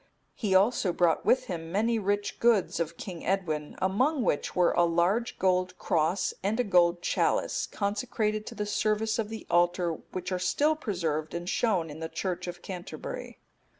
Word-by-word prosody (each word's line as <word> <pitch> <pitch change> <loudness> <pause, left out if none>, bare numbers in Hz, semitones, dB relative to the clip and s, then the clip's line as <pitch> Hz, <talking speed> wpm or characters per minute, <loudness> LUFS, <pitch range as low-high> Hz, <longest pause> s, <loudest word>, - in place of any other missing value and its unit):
He 200 -4 0
also 200 -1 +3
brought 170 -2 +1
with 260 - +4
him 165 -2 -6
many 225 +4 +1
rich 205 0 -1
goods 230 -7 +3
of 170 0 -2
King 180 -4 -7
Edwin, 160 -6 -1
among 255 +9 +1
which 145 - -1
were 180 -1 +4
a 175 - +3
large 175 +8 +1
gold 185 -1 +1
cross, 165 +4 +1
and 210 +5 -1
a - - +4
golden 175 -4 +3
chalice, - - +1
consecrated 215 0 -2
to - - -7
the 210 - -2
service 215 +1 0
of 215 -2 -1
the 220 0 -7
altar, 175 0 +3 0.2
which 180 0 -4
are 185 - 0
still 290 +13 +2
preserved, 170 - -2
and 175 0 -4
shown 185 -7 +1
in 150 - -9
the 160 0 -4
church 175 +2 -3
of 175 0 -7
Canterbury. 180 -2 -7
185 Hz, 175 wpm, -28 LUFS, 175-215 Hz, 0.2 s, with